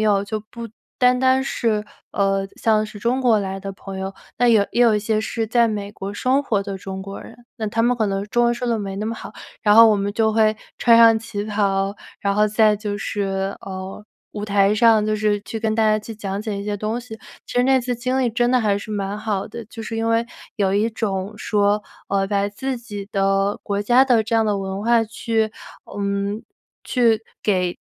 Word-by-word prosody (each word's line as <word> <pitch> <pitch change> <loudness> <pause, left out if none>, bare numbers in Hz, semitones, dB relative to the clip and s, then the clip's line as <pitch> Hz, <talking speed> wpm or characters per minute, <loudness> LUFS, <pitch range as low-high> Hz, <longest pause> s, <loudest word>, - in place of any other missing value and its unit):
友， 205 -2 +2
就 215 +1 -4
不 235 -1 -7 0.3
单 250 -1 +4
单 260 0 +3
是 220 -5 -1 0.3
呃， 195 -1 +1
像 215 -1 +2
是 210 - -11
中 245 +4 0
国 235 -5 +3
来 195 -1 -4
的 195 0 -6
朋 195 0 -8
友， 190 0 -4 0.2
那 245 - +3
有 220 -4 +5
也 240 - 0
有 230 -3 +5
一 210 - +1
些 215 +1 0
是 225 0 -3
在 235 0 +4
美 205 -2 -3
国 200 -1 -7
生 255 +6 +2
活 205 -6 0
的 195 -1 -6
中 190 0 -6
国 195 +1 -8
人， - - -12 0.2
那 220 - -3
他 220 +2 0
们 245 +1 +2
可 220 -3 +1
能 195 0 -2
中 240 +3 +1
文 240 0 +2
说 245 0 -3
得 230 - +1
没 195 -2 -4
那 200 +2 -4
么 225 - -2
好。 - - -9 0.3
然 210 -1 +5
后 230 0 +9
我 215 - +4
们 200 0 -2
就 220 0 +1
会 215 -1 +3 0.2
穿 235 -1 +5
上 230 -1 +7
旗 220 -2 -5
袍， 200 -2 0 0.2
然 200 - 0
后 210 - +4
再 215 0 +3
就 205 -1 -4
是 195 -1 -2
呃， 190 +1 -7 0.3
舞 205 -1 -5
台 200 -1 +3
上 220 0 +4
就 215 0 0
是 210 -1 +1
去 225 - -6
跟 220 -1 -1
大 225 - +2
家 215 0 +3
去 220 +1 -8
讲 200 -2 -4
解 215 -2 -4
一 200 - -5
些 205 0 -2
东 215 +4 -2
西， 235 -2 -9 0.3
其 - - -9
实 245 0 +3
那 265 0 +4
次 245 0 -3
经 255 +2 -1
历 245 -3 +1
真 240 +1 +1
的 255 - +4
还 205 -3 +1
是 215 +1 -7
蛮 200 0 -3
好 210 -3 -2
的。 235 - -8
就 225 +1 -9
是 225 - -5
因 225 0 -1
为 230 +1 +2 0.3
有 195 -3 +1
一 210 +3 +2
种 205 -3 -3
说， 205 0 +1 0.3
呃， 195 0 +1
把 200 0 +1
自 260 +5 -4
己 205 -4 -8
的 195 0 +1
国 200 0 -1
家 245 +5 +5
的 245 -4 +3
这 225 +1 0
样 225 - +2
的 205 -1 +1
文 195 +1 -4
化 235 0 +4
去 225 0 -1 0.5
嗯， 200 +1 -2 0.4
去 230 -4 +2 0.2
给 180 -4 0
215 Hz, 245 characters per minute, -21 LUFS, 200-230 Hz, 0.5 s, 后